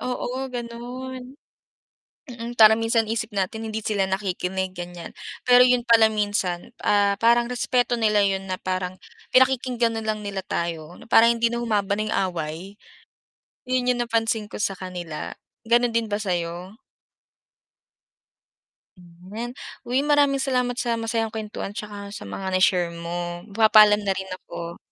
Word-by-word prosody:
Oo, 255 +1 -3
gano'n. 250 +1 -6 1.1
Mm, 235 -1 -6
parang 220 -1 +7
minsan 225 0 +2
isip 225 -1 -2
natin 200 +4 -2
hindi 220 0 -4
sila 200 -3 0
nakikinig, 190 -1 -2
ganiyan. 175 -1 -7 0.3
Pero 245 0 +6
'yun 250 -1 +3
pala 230 -2 +6
minsan, 205 -1 -1
ah, 205 -1 +3
parang 235 +1 +4
respeto 245 0 +1
nila 210 -2 +3
'yun 195 -1 0
na 185 - -2
parang 185 0 -2 0.4
pinakikinggan 250 -3 +3
na 220 - -7
lang 215 -1 -1
nila 200 -1 -4
tayo, 170 -1 -4
na - - -14
para 225 - +7
hindi 235 0 +2
na 235 - -2
humaba 205 -4 0
na 215 - -1
'yung 215 - -1
away. 155 -3 -4 1.1
'Yun 250 -1 +2
'yung 245 - -3
napansin 225 -2 0
ko - - -8
sa 200 - +1
kanila, 175 -4 -6 0.3
ganun 240 0 +3
din 230 -1 0
ba 205 - -1
sa'yo? 175 -1 -3 2.2
Hmm, 175 0 -17
'yan. 235 +2 -4 0.3
Uy 250 +2 +1
maraming 285 -1 +3
salamat 250 -2 0
sa 240 -4 0
masayang 225 0 -1
kuwentuhan 210 -2 -5
'tsaka 205 -1 -7
sa - - -8
mga 100 - -6
na-share 180 -2 +3
mo. 175 +1 -5
Magpapaalam 210 0 +6
na 195 -2 -1
rin 190 0 -5
ako. 170 -2 -8
215 Hz, 150 wpm, -24 LUFS, 185-235 Hz, 2.2 s, parang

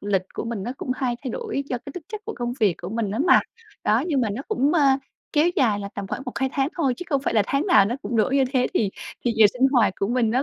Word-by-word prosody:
lịch 200 -2 0
của - - -4
mình 230 -4 -4
nó 240 - -3
cũng 255 - -5
hay 255 -2 -1
thay 255 - -2
đổi 440 - -3
do 250 -3 -2
cái 280 - -7
tính 360 - -7
chất 430 -1 -6
của 445 - -5
công 240 0 -2
việc 205 -5 +4
của 175 - -4
mình 220 0 -2
á 215 - -3
mà. - - +7 0.4
Đó, 220 +4 +3
nhưng 295 -6 +1
mà 230 - +1
nó 225 +7 -4
cũng, 275 +4 +1
ơ, 335 - +4 0.5
kéo 310 +2 +4
dài 220 -7 +3
là 200 - -5
tầm 200 -1 -5
khoảng 255 - -4
1-2 265 +1 -1
tháng 270 0 +1
thôi, 275 -7 +1
chứ 360 - -7
không 280 -3 +1
phải 280 - -1
là 215 - +5
tháng 280 +6 0
nào 215 - +6
nó 220 +5 -1
cũng 225 +3 -3
đổi 225 +5 +2
như 270 - +4
thế 250 -2 +2
thì 205 -4 +1 0.3
thì 240 - +2
giờ 220 -1 +8
sinh 255 +2 +3
hoạt 220 -8 +4
của 195 - +1
mình 240 -2 +1
nó 255 +4 +2
245 Hz, 300 wpm, -24 LUFS, 215-275 Hz, 0.5 s, giờ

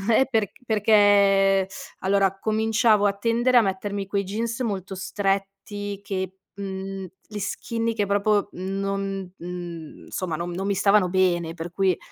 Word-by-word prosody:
Eh, 265 - +5
perc 220 -4 +1
perché 200 -3 +4 0.3
allora 195 0 +1
cominciavo 220 -1 +3
a - - +3
tendere 235 +4 +2
a - - +8
mettermi 195 0 -2
quei 200 0 0
jeans 230 +5 -3
molto 195 -4 -3
stretti 195 +1 -3
che, 190 -1 -4 0.2
mhmm, 195 -1 -5 0.2
gli 210 - -7
skinny 230 +3 -2
che 205 -2 0
proprio 205 +1 +2
non, 195 0 -3
mhmm, 175 -2 -7
insomma 170 -4 -3
non 175 +1 -4
non 190 +3 -3
mi 200 - +1
stavano 200 -1 +4
bene, 175 -3 +1
per 170 +1 -7
cui, 190 -2 +2
195 Hz, 145 wpm, -24 LUFS, 190-205 Hz, 0.3 s, a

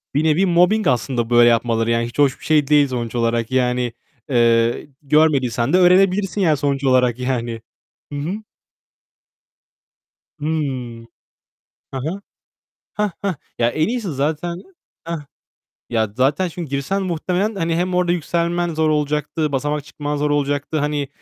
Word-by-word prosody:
Bir 150 - +2
nevi 160 +5 +3
mobbing 180 +3 +3
aslında 125 -2 0
böyle 120 0 +6
yapmaları, 115 -1 +1
yani 115 0 +1
hiç 120 - -9
hoş 140 -2 +3
bir - - -13
şey 150 -3 +3
değil 145 -1 +4
sonuç 120 -2 -4
olarak. 115 0 0
Yani, 125 -2 0 0.4
eee, 115 -1 +2
görmediysen 140 -3 +2
de - - +6
öğrenebilirsin 190 +2 +3
yani 155 -5 +3
sonuç 140 -1 -1
olarak 125 -2 +3
yani. 120 -3 -2 0.5
Hı 145 - -3
hı. 190 +9 -4 2.0
Hı. 150 - -5
Hı 125 -7 -4 0.8
hı. 170 +9 -4 0.7
Hah 210 -1 -1
hah. 195 -4 -1 0.2
Ya 120 0 +3
en 155 +8 0
iyisi 230 -6 -2
zaten, 155 +5 -2 0.5
heh. 170 0 -4 0.8
Ya 110 -2 +1
zaten 145 +8 +2
çünkü 165 -3 -7
girsen 140 +9 -1
muhtemelen 185 +4 -1
hani 165 -3 -1
hem 180 +1 -1
orada 180 -1 +2
yükselmen 170 0 -1
zor 160 0 +1
olacaktı. 150 0 -1
Basamak 145 +2 -1
çıkman 150 0 -4
zor 145 0 0
olacaktı. 145 +1 -1
Hani 145 -1 -1
145 Hz, 145 wpm, -20 LUFS, 125-170 Hz, 2.0 s, böyle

